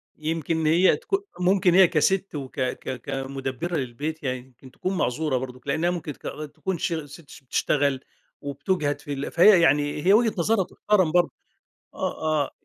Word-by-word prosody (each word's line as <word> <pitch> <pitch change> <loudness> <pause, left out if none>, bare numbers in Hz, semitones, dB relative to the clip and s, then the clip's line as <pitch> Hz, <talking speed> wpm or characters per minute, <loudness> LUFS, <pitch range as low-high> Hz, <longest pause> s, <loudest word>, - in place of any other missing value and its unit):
يمكن 160 +1 -2
هي 175 +4 +5
تكو 400 -5 -1 0.2
ممكن 180 -1 +3
هي 185 -1 +7
كست 190 +4 +1
وك 135 -1 -6
ك 130 0 -3
كمدبرة 135 +5 -4
للبيت 145 +4 -4
يعني 130 -1 -1
يمكن 130 0 -17
تكون 185 0 -3
معذورة 140 0 0
برضه، 125 0 -6
لأنها 160 +5 +1
ممكن 165 -4 -4
تك - - -20
آآ 155 - -5
تكون 185 +5 -4
شغ 160 -2 -2
ست 145 +1 -14
ش - - -13
بتشتغل، 140 +1 +1 0.4
وبتجهد 145 +1 -1
في 145 - -5
ال 140 0 -4
فهي 180 +1 +6
يعني 145 -1 +2
هي 195 - +6
وجهة 225 0 +4
نظرها 195 +4 +2
تحترم 190 -6 +1
برضه. 175 0 +3 0.6
آه - - -3 0.2
آه. - - -9
155 Hz, 170 wpm, -25 LUFS, 135-180 Hz, 0.6 s, هي